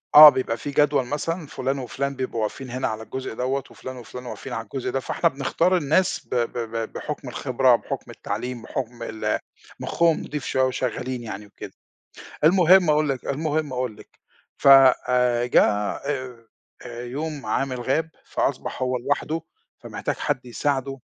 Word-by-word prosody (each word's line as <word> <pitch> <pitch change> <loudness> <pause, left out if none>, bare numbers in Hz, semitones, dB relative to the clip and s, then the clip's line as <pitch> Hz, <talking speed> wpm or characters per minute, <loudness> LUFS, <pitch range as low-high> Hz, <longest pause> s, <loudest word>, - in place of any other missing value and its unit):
آه، 150 0 +14
بيبقى 130 -4 -1
في 145 +5 -5
جدول 145 -2 +3
مثلًا 155 +4 -3
فُلان، 135 +1 -2
وفُلان 140 +2 -3
بيبقوا 130 -3 -3
واقفين 125 +4 -4
هنا 130 +2 -1
على 110 0 -4
الجزء 130 +2 -5
دوّة، 130 +4 -1
وفُلان 130 0 -9
وفُلان 125 +1 -9
واقفين 125 +1 -7
على 115 -1 -3
الجزء 125 +4 -4
ده، 135 - 0
فإحنا 170 +5 +1
بنختار 165 +6 +1
الناس 165 +3 +1
ب - - -3
ب 120 0 -1 0.2
ب 115 -1 -3
بحُكْم 145 -3 -5
الخبرة، 130 0 +3
بحُكْم - - -5
التعليم، 120 +4 -5
بحُكْم 120 0 -5
ال 110 -1 -2 0.4
مُخُّهم 170 -2 +2
نِضيف 150 -2 -5
شوية، 130 - +1
وشغالين 130 -1 -2
يعني 105 -2 -6
وكده، 105 - -10 0.7
المهم 180 0 +6
أقول 150 0 +3
لِك، 135 -3 -2
المهم 150 0 -1
أقول 125 -4 -2
لِك - - -18 0.4
ف - - -6 0.4
آآ، 125 -1 +2
جه، 125 - +5
آآ، 125 +4 -2 0.6
يوم 145 +4 -5
عامل 130 -2 -1
غاب، 150 +6 0
فأصبح - - -2
هو 130 0 0
لوحده، 145 +5 -1 0.4
فمحتاج - - -4
حد 125 - -2
يساعده، 135 +2 -1
130 Hz, 160 wpm, -24 LUFS, 125-145 Hz, 0.7 s, آه